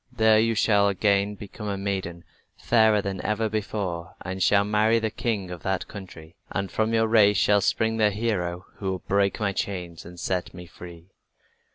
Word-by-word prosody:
There 110 -2 +4
you 115 +1 +2
shall 105 -2 +3
again 100 +1 +1
become 105 +1 -9
a 100 -1 -2
maiden, 95 -4 -4 0.3
fairer 110 -3 +3
than 95 -2 -4
ever 110 +1 0
before, 100 -6 -4
and 95 +1 -5
shall 100 +2 +4
marry 105 +2 +2
the 110 -1 -1
king 100 -7 -3
of 90 - -7
that 95 -1 -2
country. 85 -5 -11 0.2
And 100 -2 -3
from 110 0 0
your 110 0 +3
race 105 -2 +4
shall 100 +1 +3
spring 110 +3 +1
the 105 -1 +4
hero 95 -5 -2
who 95 - -3
will 95 -1 -4
break 100 0 +1
my 100 -2 0
chains 90 -4 -4
and 85 +1 -12
set 95 +1 -3
me 90 0 -9
free." 85 +1 -13
100 Hz, 185 wpm, -25 LUFS, 95-110 Hz, 0.3 s, There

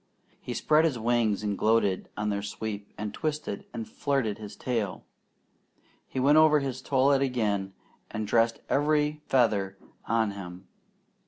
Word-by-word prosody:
He - - -5
spread 155 +1 +3
his 155 -6 +1
wings 115 -3 +1
and 105 -1 -1
gloated 105 -3 +1
on 105 0 -1
their 100 -1 -1
sweep, 100 0 -5
and 105 -1 -4
twisted 155 - -3
and 230 +1 -5
flirted 135 - -1
his 105 -1 -8
tail. 115 -6 -2 1.0
He - - -4
went 145 +4 +5
over 155 -1 +6
his 130 -2 -4
toilet 135 +1 +3
again 105 -7 0 0.4
and 110 0 -3
dressed 115 +1 +2
every 150 +1 +1
feather 105 -7 +2 0.3
on 110 -2 +1
him. 95 -1 -9
115 Hz, 145 wpm, -28 LUFS, 105-140 Hz, 1.0 s, over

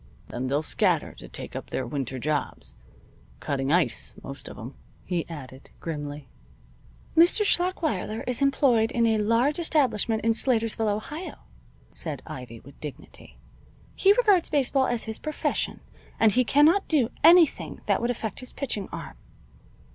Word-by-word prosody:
Then 125 +2 -4
they'll 145 +4 0
scatter - - 0
to - - -12
take - - -8
up - - -6
their 130 - -3
winter 130 0 -4
jobs 140 - -3 0.7
cutting 135 -1 -2
ice, 160 -9 0
most - - -8
of - - -10
'em," - - -8 0.3
he 175 -2 -2
added, 135 -4 -10
grimly. 145 -3 -6 0.9
"Mr. 345 +6 +6
Schlachweiler 325 - 0
is 250 +1 -1
employed 265 -5 +3
in 235 -3 +2
a 220 -1 +2
large 230 +9 +2
establishment 250 - +1
in 230 - +3
Slatersville, 225 -2 +2
Ohio," 295 - -4 0.6
said - - -4
Ivy, 120 -3 -9
with 140 +1 -16
dignity. 150 -3 -10 0.6
"He 390 - +4
regards 415 -7 +3
baseball 270 -2 +2
as 240 -2 -1
his 220 0 -5
profession, 305 0 -2 0.4
and 220 -1 +5
he 255 +4 +3
cannot 305 +10 +4
do 260 -7 +2
anything 335 -1 +5
that - - +1
would 235 - 0
affect 220 -4 -3
his 255 - -9
pitching 230 -8 -3
arm." - - -8
225 Hz, 145 wpm, -26 LUFS, -, 0.9 s, Mr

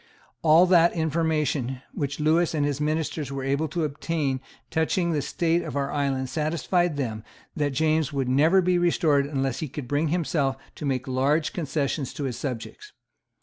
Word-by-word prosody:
All 165 +2 +6
the 175 -2 +5
information 150 -5 0
which 140 0 -3
Lewis 160 +2 +2
and 145 -2 +1
his 145 0 -2
ministers 155 -2 -1
were 135 -1 -4
able 140 +4 0
to 165 +3 -2
obtain 145 -2 -2 0.3
touching 170 +2 +1
the 150 -3 0
state 170 +4 0
of 130 - -6
our 140 -1 -1
island 135 -2 -1
satisfied 160 +3 0
them 110 -6 -3 0.3
that 145 -2 0
James 155 +1 +1
would 135 -3 -1
never 160 +9 +4
be 180 0 +2
restored 155 -5 +2
unless 135 -3 -1
he 155 - -3
could 135 -1 -7
bring 145 +4 +1
himself 150 -5 0 0.2
to 150 - -4
make 130 -2 -1
large 140 +5 +1
concessions 145 -4 -2
to 145 - -4
his 130 -3 -2
subjects. 140 - -6
150 Hz, 170 wpm, -25 LUFS, 135-160 Hz, 0.3 s, All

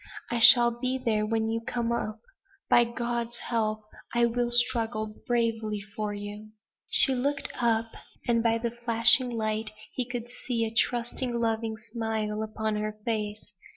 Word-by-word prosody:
I 240 - 0
shall 240 0 +8
be 255 +2 -2
there 220 -4 -1
when 220 0 -1
you 225 +1 -2
come 235 0 -3
up. 230 -2 -3 0.5
By 240 - +6
God's 235 0 -3
help, 215 -2 -2 0.3
I 235 0 +4
will 240 +1 -1
struggle 230 -3 +1
bravely 225 -3 -1 0.2
for 215 -1 -3
you." 205 +1 -8 0.4
She 265 - +7
looked 275 +3 -1
up; 225 -1 +1 0.4
and 235 -1 +2
by 230 0 +1
the 235 0 -3
flashing 240 +2 +6
light 220 -2 -2 0.2
he 255 - -2
could 240 -1 -5
see 240 -1 -3
a 220 - -5
trusting, 240 +1 -1
loving 225 -1 -2
smile 220 -1 -4
upon 220 0 -3
her 215 0 -4
face. 210 -2 -4
230 Hz, 155 wpm, -27 LUFS, 215-240 Hz, 0.5 s, shall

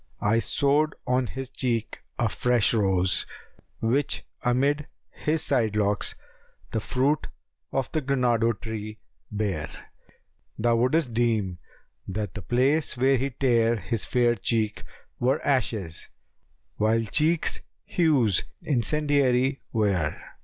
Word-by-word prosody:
I 115 +3 +2
sowed 145 +5 +1
on 125 -1 +1
his 135 +1 -7
cheek 120 -4 -2 0.2
a 120 - +2
fresh 120 +1 +2
rose, 95 -4 +2 0.5
which 130 +6 0 0.2
amid 140 +4 +1
* - - -51 0.2
His 155 +1 +2
side 115 -6 +1
locks 105 -1 0 0.6
the 110 - 0
fruit 135 +6 0 0.4
of 135 -3 -1
granado 125 -7 +1
tree 110 -1 -6 0.3
bare. 100 -7 -2 0.9
Thou 115 +1 +2
wouldst 130 +2 +1
deem 110 -6 0 0.5
that 100 -1 -3
the 105 - -6
place 130 - +1
where 135 +2 +4
he 135 +3 -1
tare 120 -3 +2
his 110 +2 -1
fair 120 -1 +2
cheek[FN#278] 110 -1 -1 0.2
* - - -41
Were 130 +4 +1
ashes, 110 - -1 0.7
while 110 +2 +2
cheeks 155 +8 +2 0.3
hues 140 - +3 0.2
incendiary 135 -1 +1
wear. 100 -9 0
120 Hz, 115 wpm, -26 LUFS, 110-135 Hz, 0.9 s, where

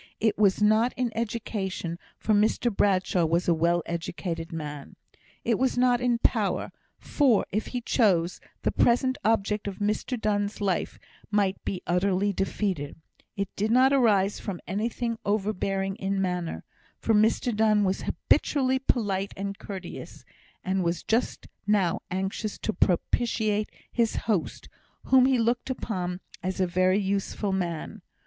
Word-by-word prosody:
It 220 -1 +2
was 205 0 +3
not 220 +3 +4
in 245 -3 -1
education, 205 -6 -3 0.2
for 220 - 0
Mr 215 +2 +2
Bradshaw 185 -3 +2
was 165 +2 +1
a 175 - +5
well 170 +1 +2
educated 170 0 -4
man; 150 -3 -6 0.5
it 230 -3 +1
was 260 -1 +1
not 245 -1 +3
in 245 -1 +2
power, - - 0 0.3
for, 265 -8 +2
if 215 +3 -1
he 245 - -3
chose, 185 -8 +2 0.2
the - - +2
present 255 +2 +2
object 210 -1 +1
of 195 -2 -4
Mr 215 +4 -1
Donne's 205 -1 -1
life 195 -4 -1 0.3
might 200 -2 +1
be 185 - -4
utterly 190 +3 +1
defeated; 190 -6 -2 0.4
it 200 0 -1
did 210 +2 0
not 260 +4 +5
arise 210 -7 +3
from 190 -5 -5
anything 230 +4 -2
overbearing 195 -2 -1
in 195 0 -1
manner, 180 -3 -2 0.3
for 225 - 0
Mr 220 +2 +2
Donne 215 -1 +3
was 190 0 0
habitually 265 -2 +1
polite 200 -7 -1
and 200 0 -4
courteous, 190 -3 -8 0.4
and 190 0 0
was 170 0 -1
just 230 +3 -1 0.2
now 200 -5 +2
anxious 195 +3 -3
to 220 - -2
propitiate 215 +3 +1 0.2
his 230 -2 +1
host, 210 -7 -2 0.4
whom 260 -1 +5
he 265 -1 +3
looked 240 +2 0
upon 185 -8 -3 0.2
as 185 +1 -3
a 185 - +3
very 185 +2 +2
useful 200 0 -1
man. 175 -4 -3
205 Hz, 145 wpm, -27 LUFS, 185-225 Hz, 0.5 s, a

